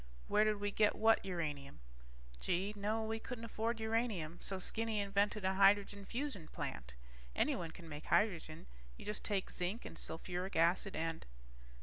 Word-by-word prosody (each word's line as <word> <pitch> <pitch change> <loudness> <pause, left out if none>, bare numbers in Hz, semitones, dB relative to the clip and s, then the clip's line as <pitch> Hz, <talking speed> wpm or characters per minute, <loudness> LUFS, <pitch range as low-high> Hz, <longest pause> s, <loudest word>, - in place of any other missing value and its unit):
Where 210 - +4
did 215 -1 +1
we 205 0 -1
get 210 0 +3
what 225 +1 +4
uranium? 150 - -4 0.6
Gee, 190 +3 0
no, 215 +2 -1
we 220 0 -2
couldn't 230 0 -6
afford 230 +1 -2
uranium, 220 -7 -1
so 190 - -2
Skinny 220 +3 +3
invented 200 0 +1
a 190 - +2
hydrogen 200 +1 +4
fusion 245 - -3
plant. - - -5 0.4
Anyone 165 - +1
can 170 +1 -11
make 150 0 -7
hydrogen. 170 -7 +1 0.3
You - - -10
just 210 - -3
take 200 -3 -1
zinc 185 +7 -3
and - - -8
sulfuric 180 +3 -3
acid 175 +4 +3
and 165 0 -2
200 Hz, 155 wpm, -37 LUFS, 175-220 Hz, 0.6 s, Where